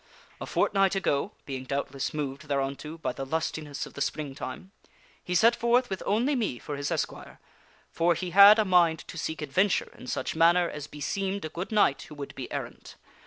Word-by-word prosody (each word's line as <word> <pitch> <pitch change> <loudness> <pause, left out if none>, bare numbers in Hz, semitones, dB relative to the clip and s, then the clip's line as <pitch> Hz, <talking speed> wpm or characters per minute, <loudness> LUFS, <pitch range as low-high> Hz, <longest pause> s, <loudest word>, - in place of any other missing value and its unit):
A - - -5
fortnight 195 -1 +2
ago 145 -7 0
(being 135 -2 -5
doubtless 140 0 -3
moved 145 -1 -4
thereunto 140 +3 -3
by 160 - -3
the 135 - -5
lustiness 150 0 -3
of - - -13
the 140 - -7
Springtime), 150 +6 -4 0.5
he 180 - -3
set 230 +6 +5
forth 240 0 +2
with 190 - -3
only 240 +8 +2
me 220 - -1
for 145 - -6
his 140 0 -3
esquire, - - -4 0.5
for 170 +1 +2
he 175 +2 -4
had 200 +3 +9
a 215 - +3
mind 175 -4 +3
to - - -9
seek 160 0 -3
adventure 185 +8 +1
in - - -12
such - - -3
manner 170 +2 +4
as 150 -3 -7
beseemed 195 +6 -3
a - - -4
good 175 +6 -6
knight 210 -10 +3
who 150 - -10
would 140 -1 -7
be 130 - -7
errant. - - -6
160 Hz, 190 wpm, -28 LUFS, 140-195 Hz, 0.5 s, had